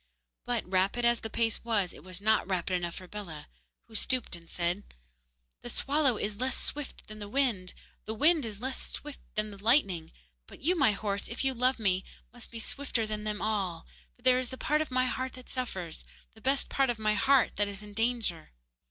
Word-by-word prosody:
But, - - 0
rapid 195 +6 +2
as 235 -1 +4
the 220 - -5
pace 225 0 0
was, 210 -6 +1
it - - -13
was 185 0 -9
not 220 0 +3
rapid 185 -1 0
enough 175 -1 0
for 185 - -8
Bellah, 175 -7 -7 0.4
who - - -17
stooped 250 -1 0
and 170 -1 -13
said: 175 +3 0 0.8
'The 240 - -6
swallow 275 -1 +2
is 205 0 -2
less 255 0 0
swift 295 -2 -4
than 215 0 -9
the 205 -1 -6
wind, 220 -8 +1 0.3
the 220 - -3
wind 310 +5 +5
is 215 -3 -4
less 260 +2 -2
swift 295 -1 -5 0.2
than 215 0 0
the 200 0 -11
lightning. 200 - +3 0.4
But - - -13
you, 355 +5 +4
my 275 -10 +5
horse, 200 0 -1
if 230 - -2
you 265 - +4
love 255 +2 +3
me, 190 -4 +2 0.3
must 245 -1 -11
be 230 - -8
swifter 235 0 -1
than 215 0 -3
them 210 -1 -2
all, 195 -6 0 0.3
for 245 - -27
there 255 0 +6
is 255 -2 -3
a 260 - -6
part 300 +3 +2
of 310 - -2
my 255 0 +2
heart 255 0 -2
that 255 -1 -12
suffers 190 -11 -3 0.3
the 220 - -17
best 270 +3 +2
part 270 -1 +2
of 240 - 0
my 215 -1 +2
heart 265 +4 +4
that 205 - +2
is 200 +1 -6
in 205 0 -10
danger. 225 - 0
220 Hz, 215 wpm, -31 LUFS, 200-255 Hz, 0.8 s, there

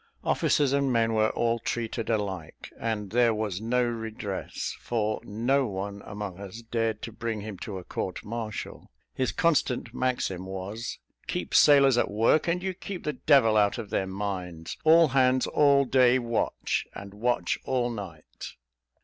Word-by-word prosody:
Officers 140 -2 +2
and 140 -1 +2
men 115 -1 +2
were 110 0 +3
all 115 0 0
treated 115 -1 -3
alike, 100 -7 -3
and 105 -4 -3
there 120 -1 +3
was 105 -3 -3
no 125 +2 +1
redress, 110 -4 -4
for 110 -2 -1
no 125 +6 +1
one 100 0 -5
among 100 -3 -6
us 100 +3 -8
dared 115 -2 -2
to 115 - -5
bring 110 -1 -4
him 105 0 -6
to 100 -3 -5
a 90 - -7
court 90 +1 -5
martial. 110 -1 -6 0.2
His 130 - 0
constant 130 -7 +1
maxim 120 -8 -1
was 95 +5 -5 0.3
"Keep - - -3
sailors 140 -4 +6
at - - +1
work, 115 +11 +2
and 180 +2 0
you 190 -1 -1
keep 185 0 -7
the 150 - -1
devil 135 -9 +4
out 105 +1 +3
of 110 -4 -7
their 95 - 0
minds 95 -4 -5
all 165 +1 +6
hands 130 -1 +3
all 140 -2 +4
day 130 -1 +4
watch, 120 -2 -1
and 100 0 -9
watch 120 +4 0
all 125 -2 0
night." 95 -8 -8
115 Hz, 160 wpm, -27 LUFS, 100-125 Hz, 0.3 s, sailors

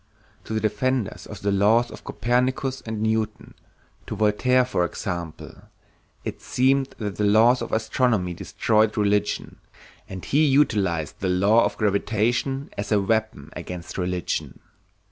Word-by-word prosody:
To 110 - -4
the - - +1
defenders 110 +2 -1
of - - -9
the 100 - +1
laws 110 +5 +3
of - - -11
Copernicus 130 +3 -1
and 110 -1 -3
Newton, 110 -1 -2 0.5
to - - -4
Voltaire 125 +4 +3
for 105 -8 0
example, 85 -2 -5 0.6
it - - -6
seemed 135 +1 +1
that 105 -3 -4
the 105 - 0
laws 110 +5 +5
of 115 - -5
astronomy 110 -5 +1
destroyed 110 +5 +1
religion, 105 0 0 0.5
and 95 -1 -7
he 150 +3 +3
utilized 100 - +1
the 95 - -1
law 100 +5 +4
of 105 - -3
gravitation 110 +6 0
as 100 +1 -4
a 105 - +4
weapon 110 -7 -1
against 90 +1 -7
religion. 90 -1 -3
110 Hz, 140 wpm, -24 LUFS, 100-120 Hz, 0.6 s, laws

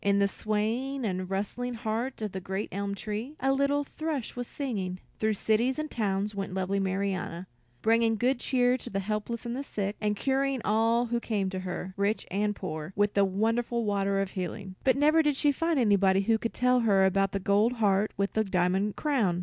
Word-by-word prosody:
In 200 0 +3
the 200 0 +4
swaying, 225 +7 -1 0.2
rustling 210 +6 -3
heart 225 +2 -3
of 210 -3 -4
a - - -1
great 190 +3 -4
elm 200 +1 -2
tree, 215 +8 -5
a 270 +1 +2
little 280 +1 +2
thrush 300 -3 -4
was 245 -1 -4
singing. 195 -10 -3 0.2
Through 220 0 +1
cities 230 +6 +1
and 310 0 -3
towns 205 -1 -1
went 195 -2 -4
lovely 190 +1 0
Marianna, 190 -2 -2 0.4
bringing 225 0 +3
good 250 +3 +1
cheer 250 0 +2
to - - -8
the 195 - -2
helpless 215 +4 -3
and 235 0 -3
the 270 - -3
sick, 205 -6 -3
and 210 -1 +1
curing 270 +3 0
all 225 +3 +3
who 235 0 -1
came 205 -5 -1
to 190 - -3
her, 185 0 -5
rich 200 +2 0
and 205 +2 0
poor, 155 -2 -5
with 205 0 +2
the 200 - +4
wonderful 225 +4 0
water 200 -1 +1
of 195 -1 -1
healing. 190 +1 -5
But 260 0 +3
never 305 +3 +5
did 295 -2 +1
she 290 +1 +3
find 330 +3 0
anybody 200 -5 +4
who 220 +2 +2
could 230 - -3
tell 250 0 +3
her 200 -5 +4
about 195 +1 +2
the 200 - -1
gold 210 +4 +3
heart 210 -3 +2
with 200 0 0
the 220 - +2
diamond 190 +1 +1
crown. 225 - +1
210 Hz, 200 wpm, -28 LUFS, 195-245 Hz, 0.4 s, never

